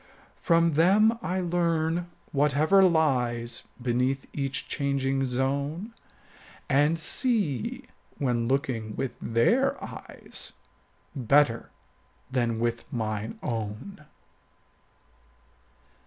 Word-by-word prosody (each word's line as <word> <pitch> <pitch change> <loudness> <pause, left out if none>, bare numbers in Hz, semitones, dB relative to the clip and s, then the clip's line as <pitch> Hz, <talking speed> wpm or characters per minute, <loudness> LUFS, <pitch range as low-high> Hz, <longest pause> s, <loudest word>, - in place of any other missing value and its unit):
From 165 -1 +3
them 205 +9 +4
I 185 -2 -1
learn 170 -1 0 0.2
whatever 150 +7 +4
lies 125 -9 +1
Beneath 125 +2 0
each 135 -1 -3
changing 135 -2 0
zone, 140 - -2 0.7
And 145 +4 +3
see, 175 - 0 0.3
when 120 -4 0
looking 120 -5 -1
with 135 - -2
their 170 - +2
eyes, - - -6 0.6
35 130 -6 -6
Better 140 -4 +3 0.6
than 120 -3 0
with 120 0 -2
mine 110 -2 -3
own. 115 - -5
140 Hz, 85 wpm, -27 LUFS, 120-165 Hz, 0.7 s, them